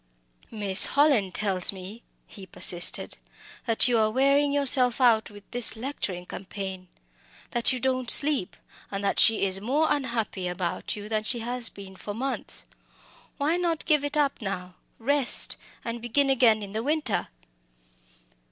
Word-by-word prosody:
"Miss 205 -3 +3
Hallin 280 -10 +2
tells 190 -2 -1
me," 195 +4 -11 0.2
he 195 -3 -13
persisted, 175 -1 +2 0.5
"that 230 +1 +3
you 240 -2 +2
are 215 -1 +2
wearing 275 +4 +2
yourself 270 -3 +3
out 230 -4 +3
with 205 -1 -14
this 245 -2 0
lecturing 220 -8 -5
campaign, 190 -1 -8 0.6
that 240 +2 +3
you 255 - -3
don't 255 -1 -2
sleep, 280 -10 +4 0.3
and 200 0 -5
that 200 - 0
she 225 -3 +4
is 190 0 0
more 275 +9 0
unhappy 235 -9 -3
about 180 +4 -4
you 210 0 -9
than 215 -1 -2
she 235 +2 -4
has 245 0 -1
been 195 -1 -12
for 205 +2 -8
months. 265 +4 -5 0.7
Why 305 +4 0
not 340 -3 -2
give 300 -3 +2
it 290 +1 -2
up 285 -4 0
now, 185 -3 -6 0.2
rest, 275 +2 +4 0.3
and 230 0 -5
begin 270 +4 +1
again 230 -5 +3
in 200 - -9
the 220 +2 -3
winter?" 295 -4 -1
230 Hz, 150 wpm, -25 LUFS, 200-275 Hz, 0.7 s, sleep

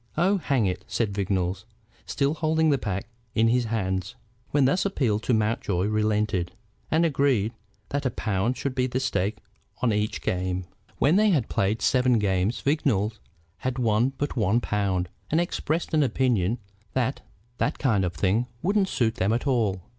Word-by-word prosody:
"Oh, 190 +5 +3
hang 135 - +1
it!" 90 0 -2
said 110 -4 -1
Vignolles, 95 -1 -1 0.4
still 140 0 +1
holding 160 0 +2
the 140 - +2
pack 100 -4 -3 0.3
in 115 +1 +4
his 120 0 +2
hands. 95 -1 -2 0.3
When 140 -2 +3
thus 145 +8 +2
appealed 125 - 0
to 125 - 0
Mountjoy 105 -4 0
relented, 105 -3 0 0.4
and 160 +2 +3
agreed 135 -8 +2 0.4
that 140 -1 -1
a - - +1
pound 110 +2 -1
should 140 0 -2
be 130 0 0
staked 110 -5 -1 0.4
on 115 -4 +3
each 105 +1 -1
game. 90 0 -1 0.3
When 155 +7 +4
they 215 0 +5
had 150 - +1
played 100 +3 0
seven 125 -2 +3
games 100 +1 0
Vignolles 115 -8 +1 0.4
had 130 -1 -3
won 120 +2 +2
but 145 - -2
one 110 -1 +2
pound, 100 -5 -1 0.2
and 160 - +2
expressed 170 -2 -1
an 155 - +4
opinion 125 -6 +1 0.4
that 130 +1 0 0.4
that 145 - 0
kind 110 -9 +2
of 90 -1 -1
thing 100 +9 +1 0.2
wouldn't 195 +1 +2
suit 115 -1 0
them 100 -2 +1
at 120 +4 0
all. 110 -9 +1
115 Hz, 165 wpm, -26 LUFS, 100-140 Hz, 0.4 s, they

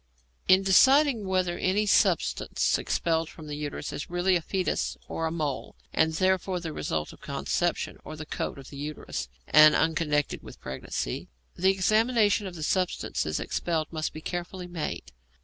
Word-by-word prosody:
In 185 +1 +6
deciding 260 +3 +5
whether 185 -2 0
any 200 +3 +1
substance 205 - +2
expelled 165 -1 0
from 160 - -11
the 150 - -6
uterus 145 -1 -5
is - - -5
really 175 +2 +2
a 175 - +1
foetus 185 +2 -1
or 165 - -2
a - - -3
mole, 150 -5 -3 0.2
and 160 0 +2
therefore 185 +1 +1
the 165 -2 -5
result 75 - -3
of - - -17
conception, - - -1
or 155 - -8
the 155 0 -7
coat - - -4
of 135 -1 -11
the 140 - -9
uterus, 140 - -5 0.2
and 155 0 +8
unconnected 155 -3 +1
with - - -12
pregnancy, 65 -1 -4 0.3
the 190 +2 +3
examination 215 +2 +3
of 180 - -8
the 160 - -6
substances 165 - -1
expelled 165 -2 -2
must 155 -1 -2
be 155 - -9
carefully 175 +2 -5
made. 175 -3 -5
170 Hz, 165 wpm, -27 LUFS, 155-190 Hz, 0.3 s, and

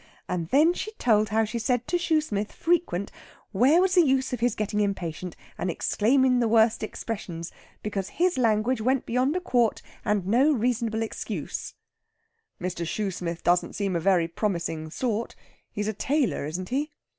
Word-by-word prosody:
And 170 -2 -3
then 305 - +5
she 425 +4 -5
told 215 - +2
how 220 +1 +2
she 235 +2 -4
said 245 +1 0
to 350 - +1
Shoosmith 305 -12 0
frequent, 325 - 0 0.4
where 255 - +4
was 370 0 +3
the 360 - +7
use 265 -4 +1
of 250 - -2
his 240 +1 +1
getting 210 0 -1
impatient, 185 -4 -2 0.2
and 180 - -1
exclaimin' 250 +8 +2
the 235 - +2
worst 225 0 +4
expressions? 185 -6 -5 0.3
Because 200 -3 -3
his 360 +1 +1
language 225 +1 +2
went 260 +3 +1
beyond 255 +6 +1
a - - +1
quart, 245 -10 +1 0.2
and 210 -4 0
no 255 +10 +4
reasonable 230 -2 0
excuse." 225 - -5 0.8
"Mr. 180 -1 -3
Shoosmith 175 -2 -3
doesn't 175 0 +2
seem 200 -3 -1
a - - +1
very 175 -1 +3
promising 170 -4 -2
sort? 230 +5 -2 0.4
He's 210 0 -3
a 215 - -1
tailor, 270 - 0
isn't 180 +4 -5
he?" 295 +4 -2
220 Hz, 165 wpm, -26 LUFS, 190-260 Hz, 0.8 s, the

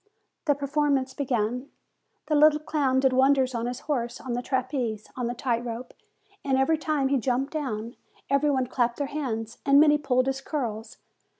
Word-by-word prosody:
The 290 -3 +3
performance 280 -2 0
began. 250 -1 -1 0.6
The 310 - -2
little 300 0 +6
clown 280 -4 +1
did 265 -1 +3
wonders 265 0 +3
on 235 0 -2
his 245 0 -5
horse, 245 -5 -2
on 255 - -5
the 245 - -1
trapeze, 250 -4 -2
on 250 -2 -2
the 240 - -3
tight 240 -2 -1
rope; 240 +1 -6 0.5
and 270 -2 +1
every 300 +4 +2
time 305 -3 0
that 265 - 0
he - - +4
jumped 255 +4 -1
down, 235 -6 -4 0.3
every 280 +2 +2
one 260 -3 +1
clapped 240 -1 0
their 285 - -1
hands, 230 -6 -4
and 280 0 +5
many 295 0 +5
pulled 255 -3 +1
his 270 0 -2
curls. 235 -7 -4
265 Hz, 185 wpm, -26 LUFS, 240-285 Hz, 0.6 s, little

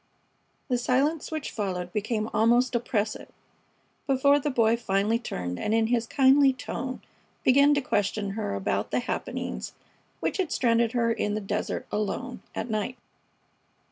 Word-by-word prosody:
The 250 -3 +1
silence 280 +6 +1
which 310 -3 -4
followed 180 -4 -3
became 215 0 -1
almost 240 +3 +3
oppressive 225 -3 -1 0.8
before 280 +1 +4
the 295 - -1
Boy 230 -4 +3
finally 215 0 +1
turned 90 - -4
and 215 - 0
in 225 0 +3
his 230 0 0
kindly 270 +1 +5
tone 255 0 -5 0.4
began 280 +3 +5
to 285 - +1
question 205 -4 -1
her 210 - -3
about 100 +1 -1
the - - 0
happenings - - -4 0.5
which - - -1
had 370 -5 -1
stranded 230 -1 +2
her 230 -2 +2
in 210 -2 -1
the - - -1
desert 205 +1 -3
alone 215 +4 -3
at 220 - -3
night. 220 +3 -2
230 Hz, 145 wpm, -27 LUFS, 210-260 Hz, 0.8 s, kindly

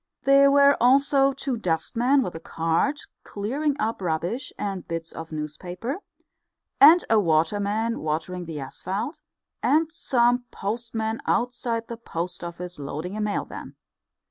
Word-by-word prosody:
There 275 0 +6
were 280 0 +6
also 275 +2 +5
two 270 -2 -3
dustmen 235 - +1
with 180 - -4
a 165 - -6
cart 165 - 0 0.2
clearing 275 +9 -2
up 220 -1 -1
rubbish 180 - -2
and 195 -3 -4
bits 165 0 -5
of 165 0 -8
newspaper, 175 - -5 0.8
and 320 +5 +8
a 225 - +4
water 165 +2 +2
man 220 +3 -1
watering 160 +4 -3
the 160 -3 -6
asphalt, 195 - -5 0.4
and 315 +2 +2
some 245 -4 +2
postmen 225 +1 -3
outside 235 -2 -1
the 235 - -6
Post 175 -5 -5
Office 175 0 -7
loading 155 +7 -5
a 215 - -3
mail 210 -1 -1
van. - - -9
215 Hz, 140 wpm, -25 LUFS, 170-260 Hz, 0.8 s, and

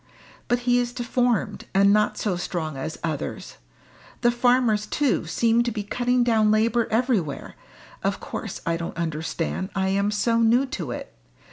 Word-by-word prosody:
But 245 0 +1
he 245 0 +3
is 245 0 -2
deformed, 245 -2 0
and 200 +1 +5
not 210 0 +2
so 205 -4 -1
strong 170 -3 -3
as 155 +4 -5
others. 155 -4 -4 0.6
The 240 - +4
farmers 240 -3 +2
too 285 +3 0
seem 230 0 +2
to 240 0 0
be 210 -2 -3
cutting 245 +4 +1
down 220 -3 +3
labour 225 +2 +2
everywhere 220 - 0 0.5
of - - 0
course - - -6
I 165 0 0
don't 170 0 -6
understand 165 +3 -3
I 190 -1 +1
am 200 +1 +1
so 230 +3 +1
new 235 +4 +4
to 180 - -5
it. 120 - -6
215 Hz, 160 wpm, -24 LUFS, 185-240 Hz, 0.6 s, and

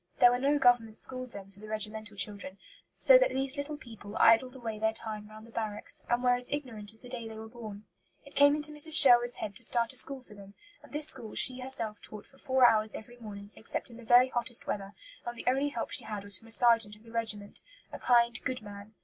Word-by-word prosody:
There 245 - +6
were 245 - -1
no 280 +3 +1
Government 240 -5 +2
schools 255 -2 -4
then 195 -1 -11
for 200 - -21
the 215 - -12
regimental 215 -1 -2
children, 200 -1 -4 0.4
so - - +6
that - - +2
these 270 - 0
little 290 +1 -6
people 220 -5 -11
idled 250 +3 +3
away 225 -4 -7
their 220 0 0
time 215 -2 -7
round 215 +1 -13
the 230 - -17
barracks, 215 -2 -2
and 240 +1 0
were 250 0 +3
as 245 0 -2
ignorant 230 -8 -5
as 220 - -21
the 250 - -13
day 245 -2 -3
they 220 -1 -10
were 220 0 -9
born. 220 -3 -11 0.4
It - - -16
came 285 +1 +4
into 300 0 -3
Mrs. 300 +2 +7
Sherwood's 245 -3 +6
head 205 -2 -7
to - - +1
start 235 0 -1
a - - -15
school 265 +1 0
for 215 - -17
them, 200 -1 -15 0.3
and 290 - -18
this 300 +1 +2
school 220 -2 0
she 255 0 +5
herself 230 -5 -3
taught 210 -1 -7
for 270 - -24
four 260 -2 +2
hours 215 -1 0
every 240 +2 -11
morning, 205 -3 -11
except 225 - -5
in 230 - -13
the 240 - -13
very 245 +3 +4
hottest 240 -1 -3
weather; 200 0 -6 0.3
and 240 0 -7
the - - -9
only 270 +3 0
help 240 -5 -6
she - - +1
had 210 -2 -6
was 200 -1 0
from 225 - -19
a - - -13
sergeant 230 -3 +4
of 210 - -22
the 230 - -16
regiment, 215 -3 -1 0.3
a - - -7
kind, 235 -1 +2
good 255 -3 -4
man. 205 +1 -12
230 Hz, 245 wpm, -29 LUFS, 215-255 Hz, 0.4 s, Mrs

